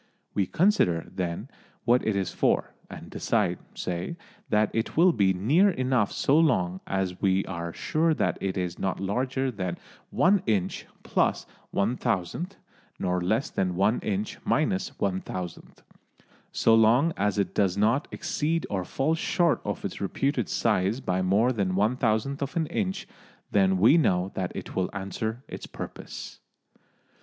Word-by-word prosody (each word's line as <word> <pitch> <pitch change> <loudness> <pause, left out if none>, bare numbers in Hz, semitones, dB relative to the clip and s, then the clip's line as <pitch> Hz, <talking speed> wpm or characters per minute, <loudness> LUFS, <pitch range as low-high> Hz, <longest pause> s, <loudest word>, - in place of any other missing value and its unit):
We 100 -3 +1
consider, 155 - +2
then, 85 -2 -3 0.4
what 120 +1 +4
it 110 - +2
is 95 -3 -1
for, - - +1 0.2
and - - -10
decide, - - 0 0.2
say, 90 - -4 0.3
that 105 0 +2
it 115 +5 -2
will 175 +2 +6
be 100 -6 +3
near 140 - +4
enough 130 - +1
so 145 +3 +3
long 95 - +2
as 95 -2 -2
we 95 -1 +2
are 85 -2 -4
sure 160 - +1
that - - 0
it 95 -1 -2
is 90 -2 -3
not 95 - -1
larger 130 +6 -1
than 95 -6 -3 0.3
one 195 +1 +3
inch 95 -4 0 0.2
plus - - +1 0.2
one 110 +6 0
thousandth, 120 - -2 0.4
nor 90 0 0
less 110 +9 0
than 90 -2 -1
one 100 +5 +2
inch 105 0 -3
minus 135 -10 +1
one 95 -2 0
thousandth. 90 -2 -7 0.7
So 115 - +3
long 120 +9 +5
as 105 +1 0
it 100 - 0
does 100 -2 +1
not 115 +8 +2
exceed 165 -1 -1
or 95 -3 -1
fall 135 - 0
short 170 0 +1
of 105 - -4
its 100 - -5
reputed 120 - -1
size 95 +7 +1
by 95 -7 -1
more 100 +7 +3
than 100 -6 -1
one 105 +5 +2
thousandth 125 +4 0
of 140 +4 -3
an 165 -2 +1
inch, 190 +4 -2 0.4
then 95 -2 +3
we 115 - +6
know 90 - +1
that 90 -2 -2
it - - -7
will 95 -1 0
answer 110 +5 -4
its - - -8
purpose. - - -8
105 Hz, 160 wpm, -27 LUFS, 95-135 Hz, 0.7 s, will